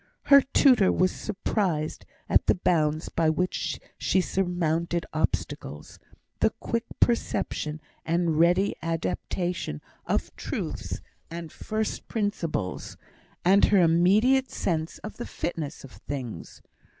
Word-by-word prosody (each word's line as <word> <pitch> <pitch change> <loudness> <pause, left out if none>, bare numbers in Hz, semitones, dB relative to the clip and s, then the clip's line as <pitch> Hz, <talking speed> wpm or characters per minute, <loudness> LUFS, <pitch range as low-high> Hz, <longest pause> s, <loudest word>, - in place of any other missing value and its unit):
Her 280 -1 +8
tutor 255 -6 +4
was 185 0 +2
surprised 190 -6 -2 0.2
at - - +3
the - - +5
bounds 155 -3 +1
by 165 -1 +2
which 180 +4 -1 0.2
she 190 - +2
surmounted 170 -2 0
obstacles, 75 - -3 0.4
the - - +4
quick 230 0 -2
perception 155 -9 0 0.2
and 165 -1 +1
ready 175 +4 +4
adaptation 165 - -2 0.3
of - - -1
truths - - -4 0.3
and 165 -1 -7
first 215 0 -3
principles, 175 - -2 0.5
and 195 +3 +6
her 205 - +4
immediate 200 +11 +4
sense 160 -3 -2
of 215 - -7
the 240 - -5
fitness 160 -4 -4
of 135 - -11
things. 125 - -7
175 Hz, 115 wpm, -27 LUFS, 160-200 Hz, 0.5 s, Her